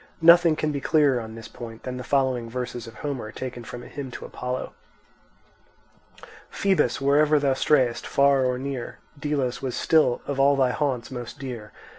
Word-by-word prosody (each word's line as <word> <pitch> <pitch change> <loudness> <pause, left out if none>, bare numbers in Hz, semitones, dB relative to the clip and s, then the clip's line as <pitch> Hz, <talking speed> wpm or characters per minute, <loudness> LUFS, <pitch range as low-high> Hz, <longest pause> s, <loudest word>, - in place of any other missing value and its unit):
Nothing 170 -1 +7
can 155 0 -1
be 140 -1 -3
clearer 145 -6 +3
on 110 0 -8
this 115 0 -9
point 115 -2 -10
than 125 0 -5
the 125 - -5
following 130 -3 0
verses 120 -1 -5
of 115 - -11
Homer, 130 -7 -4
taken 125 -1 -6
from 120 +1 -8
a - - -10
hymn 140 -2 -6
to - - -8
Apollo: 125 0 -5 1.8
Phœbus, 195 -2 +1
wherever 145 +2 +4
thou 140 -2 +2
strayest, 130 -3 +2
far 140 -1 +4
or 125 -1 0
near, 130 -2 -5 0.2
Delos 140 -4 -1
was 130 -2 -3
still 155 -7 +2
of 140 -1 -3
all 140 +1 +5
thy 130 -2 +2
haunts 130 -3 -2
most 120 -2 -7
dear. 120 -6 -7
130 Hz, 175 wpm, -25 LUFS, 120-145 Hz, 1.8 s, Nothing